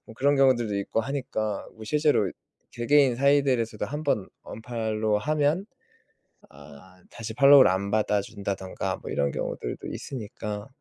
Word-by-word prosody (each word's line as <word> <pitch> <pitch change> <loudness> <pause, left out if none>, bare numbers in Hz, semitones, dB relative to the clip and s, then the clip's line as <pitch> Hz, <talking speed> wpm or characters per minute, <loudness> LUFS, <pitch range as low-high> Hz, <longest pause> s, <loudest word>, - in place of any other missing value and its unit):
뭐 110 - -12
그런 140 +5 +2
경우들도 120 -6 +3
있고 100 +3 -1
하니까 115 -5 -3
뭐 110 - -11
실제로 145 - +2 0.4
개개인 135 +2 +3
사이들에서도 130 -6 +2
1 145 +6 -5
번 110 -10 0
언팔로우 110 -2 -2
하면 150 - 0 0.8
아 75 +6 -16
다시 110 -1 -7
팔로우를 140 -2 +7
안 95 +2 -2
받아 105 -1 +1
준다든가 100 -2 -4
뭐 - - -10
이런 70 0 0
경우들도 - - -5
있으니까 105 -3 -6
110 Hz, 315 characters per minute, -26 LUFS, 105-140 Hz, 0.8 s, 팔로우를